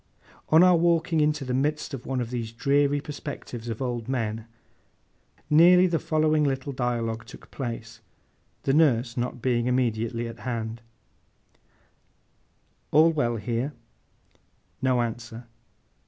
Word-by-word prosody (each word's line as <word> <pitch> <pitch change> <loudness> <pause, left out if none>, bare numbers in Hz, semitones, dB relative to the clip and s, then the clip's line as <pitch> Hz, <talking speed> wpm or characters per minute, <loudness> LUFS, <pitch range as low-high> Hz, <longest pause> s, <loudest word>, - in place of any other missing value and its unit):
On 160 +3 +7
our 180 -1 +6
walking 165 -1 +2
into 150 -2 +1
the 125 - -2
midst 150 +3 -1
of 130 -3 -7
one 130 -2 -1
of 120 0 -5
these 115 -3 -4
dreary 140 +4 +2
perspectives 125 -5 -7
of 115 +3 -3
old 120 -2 -3
men, 115 -3 -2 1.0
nearly 175 +4 +6
the 170 -3 +1
following 155 -1 +1
little 135 -1 -1
dialogue 120 -3 -2
took 125 - -14
place, 115 -3 -6 0.6
the 135 - +1
nurse 125 -6 +3
not 125 -1 -3
being 120 -2 +1
immediately 115 -2 0
at 115 - -9
hand: 115 -2 -4 2.1
'All 160 +3 +5
well 120 -7 0
here?' 120 +5 -2 1.1
No 130 -2 +2
answer. 115 0 -6
125 Hz, 125 wpm, -26 LUFS, 115-150 Hz, 2.1 s, On